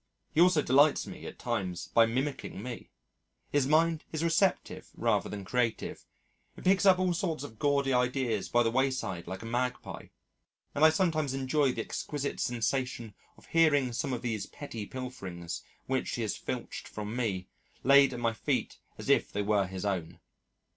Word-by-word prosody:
He 160 - +4
also 175 -4 +5
delights 140 +3 +4
me - - -8
at - - -9
times 90 -3 -3
by 115 -1 +5
mimicking 130 -3 -3
me. 125 -1 -7 0.6
His 145 -2 +2
mind 160 +1 +3
is 160 0 -2
receptive 170 +3 +1
rather - - +1
than 100 -2 -6
creative: 120 +2 -1 0.5
it - - -10
picks 190 +1 +4
up 185 -1 +7
all 185 -1 +1
sorts 165 -4 -2
of 115 -6 -10
gaudy 140 -2 +2
ideas 125 -4 0
by 120 0 +4
the 115 - +1
wayside 130 -9 -1
like 95 +3 -6
a - - -7
magpie, 125 +2 -3 0.7
and 145 - 0
I 160 - +10
sometimes 155 -5 +1
enjoy 135 0 +1
the - - -2
exquisite 145 -1 -4
sensation 120 -2 -1 0.2
of - - -18
hearing 145 -6 +3
some 130 +3 -2
of 125 -1 -3
these 110 -4 -2
petty 115 -8 -7
pilferings 95 -10 -6 0.2
(which - - -1
he - - -2
has - - -1
filched - - -5
from 105 +1 -6
me) 100 -7 -1 0.4
laid 140 +1 +7
at 125 - -5
my 115 -1 +1
feet - - -2 0.2
as - - -8
if - - +3
they 105 - -1
were 100 -2 +2
his 95 +1 -5
own. 95 -5 -2
125 Hz, 175 wpm, -30 LUFS, 110-145 Hz, 0.7 s, I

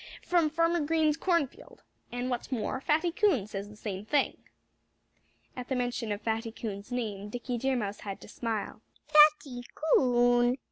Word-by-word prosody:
from 340 -3 +2
Farmer 335 +2 +2
Green's 310 0 +2
cornfield. 335 -5 -2 0.3
And 245 +1 -3
what's 245 +3 -4
more, 255 +2 -2
Fatty 315 +5 +1
Coon 335 - +2
says 205 -1 -6
the 210 - -12
same 200 -2 -5
thing." 280 +6 +1 1.2
At 250 -1 -6
the 265 - -1
mention 245 -3 -2
of 205 +1 -3
Fatty 225 0 -1
Coon's 210 -1 -6
name 210 -5 -3
Dickie 245 +2 -4
Deer 265 +2 +1
Mouse 205 -4 -3
had 195 -2 -6
to - - -11
smile. 220 -2 -4 0.2
"Fatty 300 -4 +5
Coon!" 245 -4 +3
245 Hz, 155 wpm, -29 LUFS, 220-300 Hz, 1.2 s, Fatty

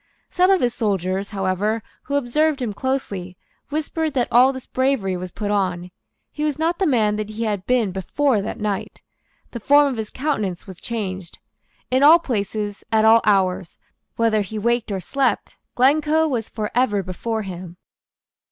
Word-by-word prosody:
Some 365 +1 +3
of 385 -2 +4
his 240 -1 +1
soldiers, 195 -3 -1
however, 200 +2 -1 0.2
who 280 - -2
observed 285 +3 +1
him 235 -5 -2
closely, 200 -8 -3 0.3
whispered 310 0 -2
that 245 -2 +1
all 250 +3 +6
this 260 -1 -8
bravery 260 -8 0
was 180 0 -5
put 205 +3 -4
on. 180 -3 -1 0.4
He 300 - -4
was 300 -2 0
not 335 +3 0
the 385 - +2
man 215 -6 +2
that 215 0 -4
he 215 +2 -4
had 205 -4 -2
been 245 -6 +2
before 215 +6 0
that 215 - -5
night. 205 -2 -4 0.5
The 235 - -6
form 285 +5 +5
of 255 - -4
his 220 -1 -4
countenance 215 - -2
was 190 -3 -11
changed. 190 -6 -5 0.5
In 260 +1 +3
all 305 +4 +9
places, 210 - -3
at 220 0 +3
all 225 +1 +7
hours, 190 -3 +1 0.4
whether 225 -2 +2
he 210 +2 -5
waked 235 +1 0
or 195 - -2
slept, 270 +6 -1 0.2
Glencoe 305 +5 +3
was 240 -7 -2
for 215 -2 -4
ever 215 -5 +1
before 220 +5 -3
him. 180 -2 -8
220 Hz, 170 wpm, -22 LUFS, 195-270 Hz, 0.5 s, all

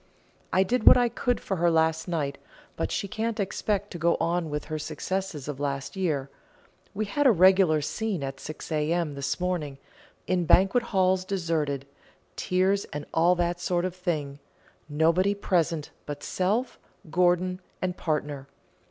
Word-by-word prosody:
I 190 - +4
did 240 +4 -1
what - - +10
I 245 -1 +3
could 245 +1 -1
for 195 - -3
her 170 +1 +3
last 160 0 +1
night, 145 -5 -2 0.4
but - - -2
she 200 - -2
can't 225 +2 -3
expect 205 +1 -1
to 175 - -6
go 170 +1 +2
on 170 -1 0
with 150 0 -3
her 155 0 -4
successes 155 0 -4
of 145 -2 -5
last 140 +1 -3
year. 155 -8 -1 0.7
We 215 +2 -1
had 275 +8 +2
a - - +7
regular 185 -4 +5
scene 195 +1 -2
at 135 0 -5
6 155 +2 -8
A.M. 155 +1 0
this 140 +2 -3
morning, 175 -6 -2 0.5
'in 180 -1 0
banquet 195 +9 +4
halls 185 -3 +2
deserted' 160 -7 -1 0.5
tears, 190 +2 +1
and 145 -1 -6
all 170 +2 +4
that 175 0 -1
sort 175 0 0
of 185 -1 -3
thing 155 -6 -3 0.5
nobody 165 +7 +2
present 170 -6 0 0.2
but 145 -1 -6
self, 215 +7 -1 0.3
Gorgon, 180 +1 +2 0.2
and 180 -1 -2
partner. 145 -5 -3
175 Hz, 160 wpm, -27 LUFS, 150-190 Hz, 0.7 s, what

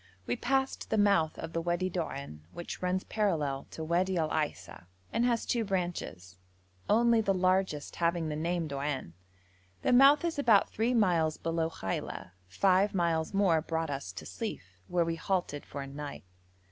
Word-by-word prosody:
We 120 - 0
passed 265 +1 -1
the 220 - +1
mouth 200 -7 +3
of 165 - -6
the 165 - 0
Wadi 175 +2 0
Doan, 140 - -4
which 175 - -7
runs 185 +1 0
parallel 155 -10 -1
to 160 - -6
Wadi 180 +3 +1
Al 160 -2 0
Aisa, 100 - -3 0.3
and 235 - +2
has 235 -2 +1
two 235 -2 0
branches, 175 - -4 0.5
only 230 +1 +4
the 195 -2 +1
largest 185 -4 0
having 170 -1 +1
the 150 - -2
name 170 +1 -1
Doan. 140 - -3 0.7
The - - +3
mouth 275 +5 +7
is 330 -4 -1
about 225 -7 +4
three 235 +3 +1
miles 170 -8 +2
below 165 -1 -1
Khaila; 95 - -5 0.2
five 190 - +2
miles 170 0 0
more 180 -5 +3
brought 160 -1 -2
us 135 -10 -4
to - - -8
Sief, 90 - -6
where 175 -1 +1
we 165 0 -2
halted 175 -6 -2
for 140 0 -5
a - - -8
night. 145 +1 -7
170 Hz, 170 wpm, -30 LUFS, 150-200 Hz, 0.7 s, mouth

